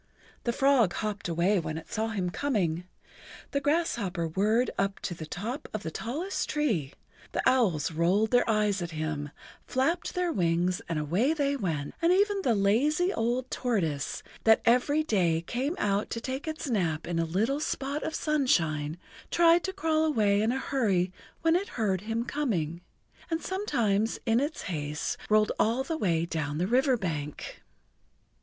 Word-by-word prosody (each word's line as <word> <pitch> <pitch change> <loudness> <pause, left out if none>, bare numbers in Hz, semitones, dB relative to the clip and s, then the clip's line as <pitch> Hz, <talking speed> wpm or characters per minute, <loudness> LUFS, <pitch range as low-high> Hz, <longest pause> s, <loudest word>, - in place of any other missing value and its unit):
The 235 - +2
frog 255 -6 +3
hopped 210 -3 -3
away 175 +4 +2
when 160 -1 -4
it 160 - -10
saw 220 0 -1
him 190 -5 -2
coming, 180 - -1 0.6
the 280 - 0
grasshopper 235 - 0
whirred 210 +9 +1
up 195 0 -1
to - - -3
the 160 -2 -8
top 220 - -5
of 215 - -4
the 160 - -4
tallest 300 - -3
tree, 220 - 0 0.4
the - - +1
owls 195 - +2
rolled 180 +7 +2
their 245 -1 +3
eyes 210 -3 +2
at 170 - -3
him, 155 -2 -3 0.4
flapped 320 +7 0
their 360 -1 +1
wings 175 0 +1
and 165 - -1
away 185 - +1
they 285 -2 +1
went, 160 - -2
and 335 +1 +4
even 400 +1 +3
the 245 -10 +2
lazy 290 - +2
old 245 +1 -1
tortoise, 165 - -1 0.2
that 220 0 +5
every 250 +6 +3
day 175 - +1
came 265 - -2
out 205 - 0
to 230 - -3
take 260 +5 -5
its 315 -1 -4
nap 170 - 0
in 170 -1 -1
a - - +2
little 215 - 0
spot 285 -1 -2
of 315 - -3
sunshine, 165 - +1 0.3
tried 335 0 +5
to 380 - -2
crawl 320 -5 +1
away 210 -10 +2
in 220 +2 +2
a 260 - -1
hurry 200 -10 0 0.3
when 330 0 +4
it 390 +3 0
heard 195 -5 +1
him 225 +2 -2
coming, 180 - -2 0.5
and 325 0 -2
sometimes 230 - 0
in 230 0 +3
its 290 +3 -2
haste 150 -3 -3
rolled 215 0 +4
all 235 +4 +2
the 325 +4 -3
way 170 - +1
down 150 -3 -3
the 175 - +1
river 255 +4 +3
bank. 150 -7 -5
220 Hz, 170 wpm, -28 LUFS, 170-275 Hz, 0.6 s, that